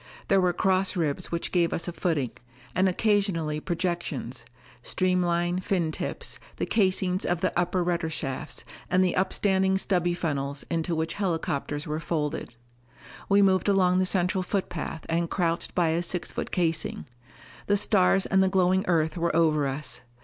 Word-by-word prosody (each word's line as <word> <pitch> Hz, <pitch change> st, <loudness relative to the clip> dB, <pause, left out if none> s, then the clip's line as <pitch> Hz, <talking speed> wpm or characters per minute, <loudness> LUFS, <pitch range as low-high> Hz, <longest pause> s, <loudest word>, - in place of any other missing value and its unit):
There 195 Hz, -1 st, +5 dB
were 180 Hz, -1 st, +3 dB
cross 190 Hz, +2 st, +1 dB
ribs 165 Hz, 0 st, -1 dB
which 170 Hz, 0 st, -2 dB
gave 170 Hz, -2 st, +2 dB
us 170 Hz, -, -2 dB
a 175 Hz, -, -3 dB
footing, 160 Hz, -8 st, -1 dB, 0.4 s
and 190 Hz, +2 st, +3 dB
occasionally 185 Hz, -7 st, +1 dB
projections 175 Hz, +1 st, -3 dB, 0.4 s
streamline 175 Hz, -1 st, +1 dB
fin 180 Hz, -4 st, 0 dB
tips, -, -, -5 dB, 0.2 s
the -, -, -2 dB
casings 185 Hz, -3 st, +1 dB
of 175 Hz, -1 st, -1 dB
the 185 Hz, -, +1 dB
upper 180 Hz, +1 st, +1 dB
rudder 170 Hz, -2 st, 0 dB
shafts, 150 Hz, -1 st, -4 dB, 0.2 s
and 185 Hz, +1 st, +4 dB
the 180 Hz, -, +1 dB
upstanding 190 Hz, 0 st, +2 dB
stubby 175 Hz, -3 st, 0 dB
funnels 140 Hz, -4 st, -2 dB
into 165 Hz, 0 st, 0 dB
which 160 Hz, +1 st, -1 dB
helicopters 165 Hz, -6 st, -2 dB
were 155 Hz, +1 st, -2 dB
folded. 150 Hz, -5 st, -3 dB, 0.7 s
We 200 Hz, 0 st, +5 dB
moved 190 Hz, 0 st, +3 dB
along 185 Hz, -2 st, +3 dB
the 185 Hz, -, +2 dB
central 185 Hz, 0 st, +1 dB
footpath 180 Hz, -4 st, -3 dB
and 170 Hz, 0 st, 0 dB
crouched 170 Hz, -3 st, -1 dB
by 170 Hz, -2 st, +3 dB
a 165 Hz, +2 st, +1 dB
six 175 Hz, 0 st, -1 dB
foot -, -, -4 dB
casing. 165 Hz, -3 st, -1 dB, 0.6 s
The 205 Hz, -, +3 dB
stars 195 Hz, -2 st, +3 dB
and 190 Hz, 0 st, +3 dB
the 190 Hz, -, +3 dB
glowing 185 Hz, 0 st, +3 dB
Earth 160 Hz, -2 st, +1 dB
were 170 Hz, -1 st, 0 dB
over 155 Hz, -3 st, +3 dB
us. 135 Hz, 0 st, -4 dB
175 Hz, 160 wpm, -27 LUFS, 160-185 Hz, 0.7 s, There